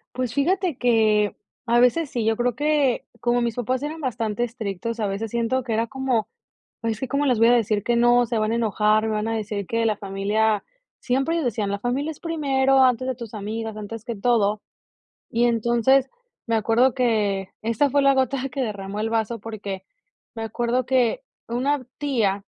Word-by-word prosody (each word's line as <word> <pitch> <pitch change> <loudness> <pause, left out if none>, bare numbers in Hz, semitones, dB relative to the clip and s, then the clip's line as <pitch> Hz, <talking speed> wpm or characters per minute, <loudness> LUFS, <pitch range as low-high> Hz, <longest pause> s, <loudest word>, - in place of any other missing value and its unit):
Pues 255 -2 -2
fíjate 345 +2 +1
que 220 -4 +3 0.3
a 240 +1 +3
veces 280 +4 +3
sí, 240 -4 -2
yo 225 0 +1
creo 245 -1 0
que 290 -3 +1
como 245 0 +1
mis 235 -1 -1
papás 255 +3 -1
eran 310 +2 -4
bastante 240 -4 -1
estrictos, 225 -1 -5
a 205 - +1
veces 205 +3 -3
siento 235 +3 0
que 235 -2 -3
era 225 +1 0
como: 260 -4 -1 0.5
"Ay, 225 -1 0
es 215 - -7
que 265 - -3
como 285 +1 0
les 250 -5 +2
voy 230 +1 +5
a - - +6
decir 215 -3 +1
que 240 - +1
no, 240 0 +4
se 235 - -2
van 215 0 +1
a 230 - +1
enojar, 215 -1 +2
me 220 - -1
van 210 +1 -1
a 225 - -1
decir 210 -2 -4
que 230 +2 0
la 215 -2 +1
familia", 205 +2 0 0.4
siempre 270 +6 0
ellos 330 -5 0
decían: 210 -4 -1
"La 200 - -2
familia 255 +7 -1
es 310 - -10
primero, 270 -5 +1
antes 255 0 +2
de 260 - -1
tus 235 -2 -9
amigas, 220 +1 -4
antes 215 +1 -7
que 235 -3 -4
todo". 210 -1 +2 0.7
Y 235 +1 +2
entonces, 240 +3 +3 0.4
me 230 - 0
acuerdo 230 +4 +3
que 210 -6 0
esta 230 +5 +1
fue 285 - +3
la 275 0 +4
gota 265 0 0
que 265 +1 -3
derramó 200 -2 -4
el 220 +1 -1
vaso, 225 0 -1
porque 200 -4 -6 0.5
me 225 - -4
acuerdo 240 +3 -1
que 255 - +2 0.3
una 255 +2 -1
tía, 215 -9 0
235 Hz, 200 wpm, -23 LUFS, 215-260 Hz, 0.7 s, a